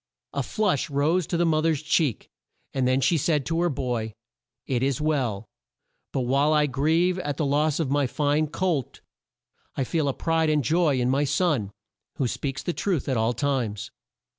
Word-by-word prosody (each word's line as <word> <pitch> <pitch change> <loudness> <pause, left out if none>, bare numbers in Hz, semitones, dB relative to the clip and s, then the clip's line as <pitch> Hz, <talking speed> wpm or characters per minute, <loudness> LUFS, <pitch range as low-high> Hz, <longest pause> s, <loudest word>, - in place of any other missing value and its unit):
A - - -1
flush 195 - 0
rose 150 +5 +1
to 170 - -1
the 175 - +2
mo 155 -2 +2
ther's 155 -2 0
cheek, 150 - 0 0.4
and 130 -2 +1
then 130 +1 +2
she 160 +5 +2
said 150 -2 +1
to 165 +1 0
her 175 - +2
boy: 120 -6 -3 0.5
"It 125 -3 -1
is 135 +2 0
well; 130 -9 -1 0.7
but 135 - -1
while 140 +5 +2
I 150 -1 +4
grieve 160 +7 +1
at 145 -6 -3
the 155 - 0
loss 150 +2 +1
of 145 -5 -1
my 145 -1 +2
fine 150 +3 +1
colt, 160 -5 -2 0.7
I 135 - 0
feel 155 +3 -1
a 135 - +1
pride 165 -1 +1
and 150 -2 +2
joy 155 -1 +2
in 125 +1 +1
my 140 +2 +2
son, 145 - +1 0.5
who 130 - 0
speaks 135 +3 -4
the 175 - -2
truth 180 -7 -1
at 130 - 0
all 115 +1 +1
times." 120 -5 -2
145 Hz, 190 wpm, -25 LUFS, 130-160 Hz, 0.7 s, I